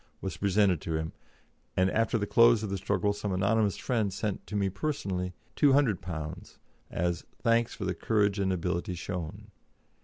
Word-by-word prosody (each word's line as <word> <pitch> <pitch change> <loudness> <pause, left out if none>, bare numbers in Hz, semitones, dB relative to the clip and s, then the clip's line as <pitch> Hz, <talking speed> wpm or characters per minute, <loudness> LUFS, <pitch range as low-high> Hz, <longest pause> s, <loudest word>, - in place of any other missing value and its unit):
was 95 - -4
presented 100 -4 +2
to 80 - -2
him, 80 0 -4 0.6
and 95 +1 +3
after 115 +1 +2
the 100 - -1
close 115 +1 +5
of 105 - -3
the 100 - -1
struggle 100 +2 0
some 105 0 -3
anonymous 100 +2 +2
friend 110 -5 0
sent 100 +1 -3
to 105 - -5
me 100 -1 +2
personally 95 -5 -2 0.3
£200 90 - +1 0.3
as 85 0 -1 0.2
"thanks 115 -1 +2
for 100 - -4
the 95 - 0
courage 100 +2 +1
and 95 -1 +1
ability 90 0 -1
shown." 85 -2 -6
100 Hz, 160 wpm, -29 LUFS, 90-110 Hz, 0.6 s, close